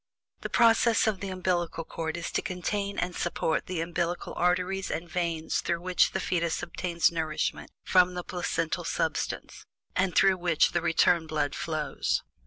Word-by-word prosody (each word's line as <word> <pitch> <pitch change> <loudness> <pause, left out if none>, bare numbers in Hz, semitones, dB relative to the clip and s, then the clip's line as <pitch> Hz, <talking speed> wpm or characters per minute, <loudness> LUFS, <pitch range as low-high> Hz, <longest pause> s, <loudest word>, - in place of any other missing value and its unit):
The - - -5
purpose 230 -1 +4
of 215 -4 0
the 195 - -4
umbillical 180 -3 -1
cord 160 0 -4
is 170 - -4
to - - 0
contain 200 +2 -3
and 180 0 -2
support 165 -2 -1
the 180 -3 -2
umbillical 170 +1 -2
arteries 180 +2 0
and 170 +2 -3
veins 165 -2 -1
through 170 -1 -1
which 185 0 +2
the 190 - 0
fetus 170 -3 -1
obtains 170 -1 +1
nourishment 160 -2 -2
from 180 -1 +4
the 180 - -3
placental 165 -2 -2
substance, - - -2 0.3
and 185 -1 +1
through 195 -1 +5
which 175 -3 +2
the 175 - 0
return 165 0 +3
blood 150 -2 -1
flows. 150 - -1
175 Hz, 160 wpm, -28 LUFS, 165-185 Hz, 0.3 s, through